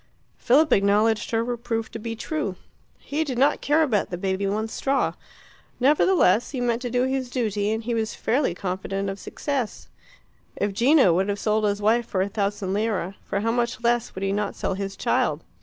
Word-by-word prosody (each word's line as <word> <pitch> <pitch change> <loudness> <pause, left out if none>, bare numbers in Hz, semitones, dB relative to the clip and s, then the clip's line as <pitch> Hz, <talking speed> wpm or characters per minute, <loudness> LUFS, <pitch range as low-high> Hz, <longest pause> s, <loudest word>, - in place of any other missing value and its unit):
Philip 300 +6 +4
acknowledged 210 +2 +2
her 225 0 +1
reproof 235 -1 -3
to 225 - -6
be 230 +1 -5
true. 225 -5 -3 0.4
He 300 +3 -2
did 265 -6 -4
not 275 +3 +3
care 305 +3 +3
about 225 -9 0
the 175 - -4
baby 190 +2 -1
one 215 +3 -1
straw. 270 +4 0 0.7
Nevertheless, 260 - +4
he 270 - -4
meant 240 -1 0
to 245 - -3
do 245 +1 +1
his 260 -1 -1
duty, 215 -5 -1
and 220 +1 -2
he 240 +1 -2
was 220 -1 -1
fairly 250 -7 0
confident 195 +1 -3
of 195 - -8
success. 270 -6 -4 0.7
If 205 0 -1
Gino 245 - +5
would 190 +4 +1
have 200 - -1
sold 215 +1 +1
his 205 0 -1
wife 225 +2 +3
for 185 -1 0
a 200 - -3
thousand 200 -2 -2
lire, 200 -3 -1
for 200 - -2
how 225 +2 +1
much 235 -1 -1
less 235 0 +1
would 190 - -5
he 195 - 0
not 205 0 -2
sell - - -2
his 195 0 -4
child? - - 0
220 Hz, 195 wpm, -24 LUFS, 200-245 Hz, 0.7 s, Gino